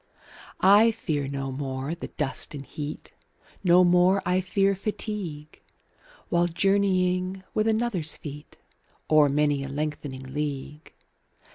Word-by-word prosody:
I 205 +4 +7
fear 155 -11 -2
no 135 -1 -4
more 135 +2 -4
the 170 - -6
dust 150 0 -3
and 140 -1 -7
heat, 150 +2 -7 0.5
25 - - -17
No 180 +1 +6
more 180 +2 +4
I 180 +1 +2
fear 195 +2 +1
fatigue, 195 -6 -4 0.7
While 175 0 +2
journeying 185 0 +1
with 215 +1 +1
another's 220 -8 0
feet 150 0 -10 0.5
O'er 150 -2 +6
many 145 0 +1
a 140 - -6
lengthening 145 -2 -4
league. 150 0 -5
165 Hz, 125 wpm, -26 LUFS, 145-190 Hz, 0.7 s, I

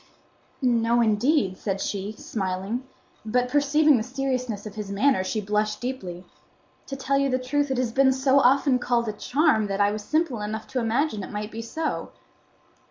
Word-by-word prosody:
"No, 235 -1 +3
indeed," 220 -2 +2
said 195 -2 -2
she, 200 +1 -3
smiling; 200 +5 -4 0.4
but 245 +3 0
perceiving 290 +1 +4
the - - -1
seriousness 255 -4 -3
of 210 - -7
his 210 -2 -6
manner, 205 0 +2
she 215 +3 -2
blushed 210 +1 -1
deeply. 190 -9 -5 0.6
"To 275 - -5
tell 275 +1 0
you 275 0 +1
the 255 - +1
truth 285 +3 -1
it 265 - -1
has 250 -2 0
been 265 +2 +4
so 265 +1 +3
often 270 0 +4
called 240 -1 0
a 215 - -2
charm 250 -1 +2
that 195 0 -3
I 205 0 +4
was 210 0 -4
simple 305 -4 0
enough 215 +1 -4
to 255 - -1
imagine 230 0 0
it - - -7
might 210 +1 -5
be 225 - -5
so." 310 +7 -3
240 Hz, 180 wpm, -25 LUFS, 210-270 Hz, 0.6 s, perceiving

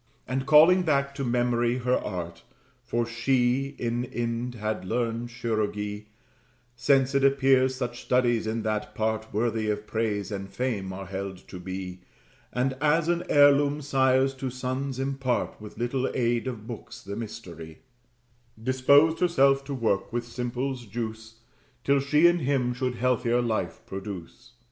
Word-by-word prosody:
And 130 +2 -2
calling 160 +5 +7
back 140 -4 +1
to 140 0 -4
memory 120 -1 +1
her 125 0 0
art, 85 -6 -3 0.4
For 120 -1 -1
she 125 +3 +1
in 120 +1 -1
Ind 120 0 -3
had 110 -2 -3
learned 115 +3 -2
chirurgery, 105 -3 -3 0.7
(Since 135 +2 +3
it 140 0 +2
appears 135 -1 +4
such 120 -2 -4
studies 120 -3 +1
in 110 0 -2
that 105 -1 -2
part 110 0 -1
Worthy 110 0 0
of 105 0 -2
praise 110 -2 -2
and 100 -1 -5
fame 110 -7 -2
are 95 +1 -6
held 95 0 -6
to 90 - -8
be, 95 0 -6 0.5
And, 130 +2 0
as 155 +2 +3
an 175 0 +1
heirloom, 145 0 +5
sires 135 -1 +3
to 130 0 -3
sons 130 +1 -3
impart, 135 -4 -2
With 105 0 -10
little 125 +3 -1
aid 120 0 +1
of 115 -4 -5
books, 115 -2 -9
the 100 - -6
mystery,) 90 -8 -8 0.8
Disposed 140 +6 +4
herself 140 -6 +3
to 140 0 -4
work 110 -6 0
with 120 0 -2
simples' 125 +1 -4
juice, 110 +1 -6 0.4
Till 140 0 +3
she 150 +4 +3
in 175 0 +5
him 130 -4 0
should 125 0 -2
healthier 125 0 +1
life 115 -3 -2
produce. 100 +4 -8
120 Hz, 150 wpm, -27 LUFS, 110-135 Hz, 0.8 s, calling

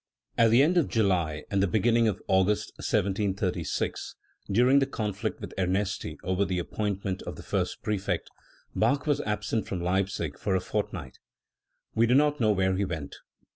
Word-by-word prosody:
At 115 -1 +5
the 120 +5 +6
end 175 +4 +3
of 165 - +3
July 90 -8 +1
and 100 -1 +2
the* 100 - +3
beginning 115 +5 +3
of 105 -3 -2
August 95 +2 +2
1736, 95 -4 -1 0.4
during 125 +6 +5
the 135 - +1
conflict 105 -6 -3
with - - -7
Ernesti 95 +2 -1
over 95 +2 +1
the 95 -2 -1
appointment 95 +1 -2
of - - -6
the - - -10
first - - -2
prefect, 100 -2 -1 0.5
Bach 140 +1 +2
was 145 -2 +1
absent 105 +1 -2
from 95 - -3
Leipzig 90 -4 -1
for 100 -2 0
a - - +3
fort 105 +3 -2
night. 75 -9 -8 0.7
We 115 +1 +3
do 125 - +4
not 150 +1 +3
know 110 -3 +3
where 95 -2 +2
he 100 - +1
went. 80 -7 -5
100 Hz, 175 wpm, -28 LUFS, 95-115 Hz, 0.7 s, the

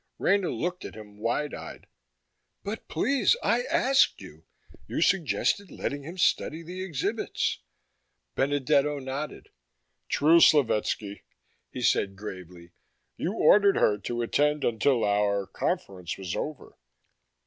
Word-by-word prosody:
Rena 195 -1 +2
looked 180 +1 -3
at - - -8
him 105 -1 -12
wide 120 +7 -1
eyed. - - -9 0.8
"But, 210 +3 -6
please, 275 - +2
I 235 +1 +2
asked 270 +2 +3
you. - - -13 0.4
You - - -3
suggested 195 +2 +1
letting 145 0 -4
him 165 +6 -9
study 165 -2 +1
the 180 +3 -7
exhibits." 190 - -2 0.7
Benedetto 145 +1 +1
nodded. 135 +2 -6 0.6
"True, 160 +4 +5
Slovetski," 105 -7 +2 0.5
he - - -6
said 95 -1 +2
gravely. 90 -4 -9 0.4
"You 180 - -3
ordered 205 -2 +5
her 105 -1 +2
to 120 +3 -3
attend 150 +4 +1
until 120 +2 +2
our 100 -1 +1
conference 90 -2 -3
was 95 -3 -5
over." 155 -1 -6
145 Hz, 120 wpm, -27 LUFS, -, 0.8 s, True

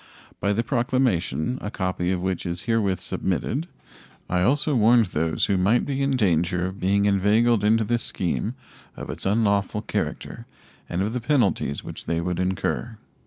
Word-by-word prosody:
By 100 - +1
the 110 +3 +1
proclamation 125 - 0
a 105 - -4
copy 90 -3 -2
of 90 -1 -2
which 95 -1 -1
is 85 0 -4
herewith 110 -6 +1
submitted 120 - -2 0.6
I 90 0 0
also 145 - +2
warned 115 -1 +5
those 80 +1 +1
who 100 - +1
might 100 +6 +2
be 140 -1 -2
in 135 -1 +1
danger 90 -4 +1
of 95 +1 -5
being 100 +2 +2
inveigled 105 +3 +3
into 110 +2 +3
this 120 +2 0
scheme 100 +6 -2 0.4
of - - -6
its - - -4
unlawful 100 0 +1
character - - -4 0.4
and 90 +2 -1
of 105 +3 -2
the 125 - -2
penalties 115 - +1
which - - -8
they 85 - 0
would 90 +1 -2
incur. 95 +5 -2
100 Hz, 165 wpm, -24 LUFS, 90-120 Hz, 0.6 s, warned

